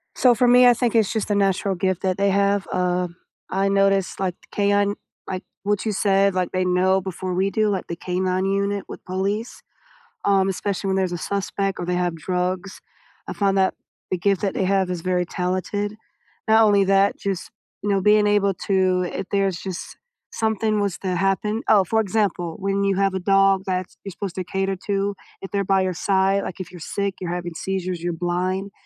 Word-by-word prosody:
So, 250 -2 +5
for 245 +2 +2
me, 250 +1 +7
I 245 - +8
think 235 -1 0
it's 220 -3 +3
just 220 -2 -2
a 205 - +2
natural 195 0 +1
gift 185 0 -1
that 185 -1 0
they 200 0 +2
have, 200 0 +1
uh, 180 0 0 0.4
I 195 +1 +1
noticed, 195 -1 +2
like, 185 -2 -1
the - - -22
K-9 205 0 +2 0.3
like, 185 0 -4 0.2
what 205 +1 0
you 220 - +1
said, 195 -1 +2
like, 180 -1 -1
they 185 0 +1
know 185 +1 +2
before 185 0 -4
we 190 +2 +1
do, 215 0 +1
like, 195 -3 -2
the 170 - -4
K-9 185 +1 -1
Unit 200 +1 0
with - - -9
police, 200 +5 -3 0.6
um, 195 -1 +3
especially 195 +1 -2
when 190 - +1
there's 190 -2 0
a 175 - -2
suspect 195 +1 -2
or 175 - -3
they 180 0 -1
have 175 -1 0
drugs, 180 +3 -3 0.5
I - - -4
found 195 -1 +1
that 190 -1 +3 0.4
the 185 - +1
gift 195 +1 +1
that 200 - 0
they - - -1
have 190 -1 +1
is 180 -2 -3
very 180 0 0
talented. 185 +4 -2 0.5
Not 220 +1 +6
only 205 -2 +5
that, 195 +1 +3
just, 195 -3 -3 0.3
you 205 - -1
know, 195 -1 +2
being 210 +1 +4
able 205 -1 +3
to 185 -2 +2
if 195 - -3
there's 195 -3 +1
just 185 -1 -7 0.3
something 220 -1 0
was 200 -3 -1
to 185 -2 -2
happen 195 +4 0
oh, 205 -3 +6
for 220 +5 0
example, 195 -5 -1
when 195 0 0
you 195 -1 +2
have 195 -1 +2
a - - -1
dog 195 0 +3
that's 185 -1 -3
you're 195 - -6
supposed 185 0 -6
to 185 - -2
cater 195 +2 -1
to, 200 0 0 0.3
if 195 - -7
they're 200 -1 0
by 195 0 +2
your 185 -1 0
side, 195 +2 +1
like, 190 - -6
if 185 - -7
you're 180 - -10
sick, 200 +4 -3
you're 175 -2 -3
having 175 -1 -4
seizures, 185 -1 -3
you're 175 0 -2
blind, 180 +3 -2
195 Hz, 210 wpm, -22 LUFS, 185-200 Hz, 0.6 s, I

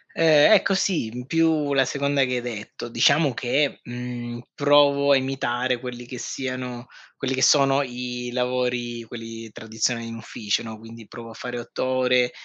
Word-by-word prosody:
Ehm, 155 -3 +6
ecco 195 - +4
sì, 185 - 0
in 125 +2 -7
più 160 -1 +1
la 135 -1 +4
seconda 140 0 +1
che 125 0 -2
hai 125 - -1
detto. 115 -3 -7
Diciamo 140 +4 +3
che, 135 +4 0
mhmm, 120 -1 -6
provo 145 0 +4
a - - +7
imitare 130 -2 -1
quelli 125 -1 -7
che 125 0 -8
siano 125 -2 -5 0.3
quelli 135 -1 -2
che 130 - -1
sono 140 0 +5
i 125 -1 -5
lavori, 125 -1 -1
quelli 115 -1 -9
tradizionali 115 +2 -2
in 115 - -7
ufficio, 105 -3 -2
no, 110 -1 -8
quindi 115 0 -12
provo 115 -1 -10
a - - -10
fare 120 +2 -6
8 120 - -5
ore, 125 -1 +2
125 Hz, 170 wpm, -24 LUFS, 120-135 Hz, 0.3 s, a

